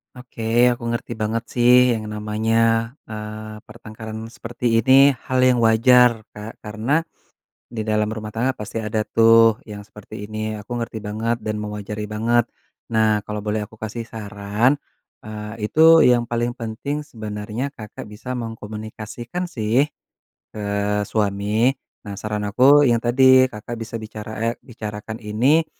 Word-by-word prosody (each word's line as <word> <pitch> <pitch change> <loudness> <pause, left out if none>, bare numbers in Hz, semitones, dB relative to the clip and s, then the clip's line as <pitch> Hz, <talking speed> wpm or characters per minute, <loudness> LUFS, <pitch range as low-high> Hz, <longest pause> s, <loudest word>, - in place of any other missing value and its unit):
Oke, 125 -2 -9 0.3
aku 120 - -13
ngerti 120 0 -4
banget, 110 +2 -2
sih, 125 0 +5
yang 110 - -4
namanya, 105 +1 -1 0.5
eee, 110 0 -7
pertengkaran 110 0 -9
seperti 120 +1 -7 0.2
ini 135 +2 +6
hal 130 0 +1
yang 130 -1 +4
wajar, 115 0 +5
Kak. 105 +2 -9
Karena 110 +9 0 0.7
di 110 -2 -5
dalam 105 -1 +1
rumah 110 -1 -6
tangga, 125 +4 -1
pasti 110 +2 -5
ada 110 0 -1
tuh, 115 +1 +5
yang 105 -1 -8
seperti 105 0 -10
ini, 110 0 -4
aku 120 +4 -5
ngerti 115 - -5
banget 110 +3 -1
dan 105 -1 -2
mewajari 105 0 -5
banget. 115 +2 +1 0.4
Nah, 110 -2 +2
kalau 105 -1 -4
boleh 105 0 -1
aku 110 - -17
kasih 110 +2 -6
saran, 105 +5 -1 0.4
eee, 105 0 -6
itu 160 +3 +7
yang 120 -1 +3
paling 120 +1 -2
penting 140 +7 -4
sebenarnya 110 0 -5
Kakak 105 -1 -9
bisa 105 +4 -7
mengkomunikasikan 115 - -6
sih 125 -4 +1 0.7
ke 105 - -6 0.5
suami. 105 +4 +1 0.3
Nah, 100 - -6
saran 105 +1 -4
aku 140 +8 +5
yang 120 -2 +3
tadi, 130 +1 +5
Kakak 115 +1 -7
bisa 115 +1 -5
bicara, 110 0 -8
eee, 115 +1 0
bicarakan 110 -2 -7
ini 130 +10 +3
110 Hz, 140 wpm, -21 LUFS, 105-120 Hz, 0.7 s, itu